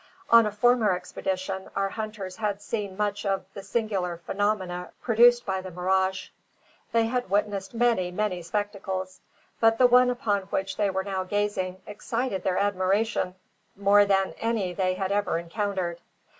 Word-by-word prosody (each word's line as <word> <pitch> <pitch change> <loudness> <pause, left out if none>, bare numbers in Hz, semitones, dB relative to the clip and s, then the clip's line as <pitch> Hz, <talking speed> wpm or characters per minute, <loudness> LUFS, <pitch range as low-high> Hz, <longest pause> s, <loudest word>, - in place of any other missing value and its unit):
On 230 -2 +8
a - - -2
former 220 -2 +3
expedition 190 +1 -4
our 195 0 0
hunters 215 -4 -6
had 210 -2 -1
seen 205 -2 -4
much 205 -1 -1
of 195 -2 -1
the 200 - -7
singular 195 -6 -2
phenomena 185 -1 -2
produced 240 +1 +5
by 190 -1 -1
the 185 - -7
mirage. 190 +2 0 0.6
They 230 -1 +3
had 245 -1 -2
witnessed 200 +1 -1
many, 230 -6 +2
many 180 -1 -2
spectacles, 190 0 -4 0.4
but 225 0 +4
the 255 - +5
one 250 0 +6
upon 230 -5 0
which 190 0 -2
they 205 -2 +1
were 190 0 -1
now 190 -1 -2
gazing 190 -2 -2
excited 225 0 -3
their 185 -1 0
admiration 200 0 +1 0.4
more 200 +1 +5
than 195 -1 +1
any 220 -6 -1
they 185 0 0
had 190 0 -2
ever 205 -3 +1
encountered. 175 -1 -3
200 Hz, 155 wpm, -26 LUFS, 185-215 Hz, 0.6 s, On